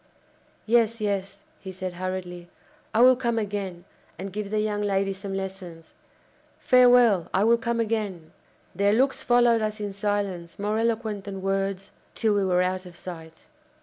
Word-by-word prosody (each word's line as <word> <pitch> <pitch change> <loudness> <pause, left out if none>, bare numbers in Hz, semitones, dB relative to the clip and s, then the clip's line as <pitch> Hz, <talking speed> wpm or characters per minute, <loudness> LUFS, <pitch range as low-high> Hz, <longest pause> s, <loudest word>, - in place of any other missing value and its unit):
"Yes, 230 0 +2
yes," 200 0 -3 0.2
he 190 - -8
said 185 -1 -5
hurriedly, 180 -1 -5 0.4
"I 225 - +2
will 255 +1 +7
come 235 -2 -1
again, 200 -5 -4 0.3
and 190 +2 -7
give 210 -1 -4
the 215 +1 0
young 210 -1 -1
lady 195 -1 0
some 195 0 -6
lessons! 185 -4 -7 0.6
Farewell! 245 -7 +5
I 190 - +3
will 230 +1 +4
come 235 0 -1
again!" 210 -8 -2 0.4
Their 200 +3 +2
looks 265 +4 +2
followed 240 -2 +3
us 215 0 -2
in 205 -1 -4
silence 200 -4 -3
more 210 +2 -1
eloquent 225 -3 -1
than 195 -2 -6
words 195 0 -2 0.2
till 220 -2 +1
we 200 -1 +1
were 180 -1 +2
out 185 0 -2
of 175 - -13
sight. 165 -3 -10
200 Hz, 160 wpm, -25 LUFS, 185-220 Hz, 0.6 s, will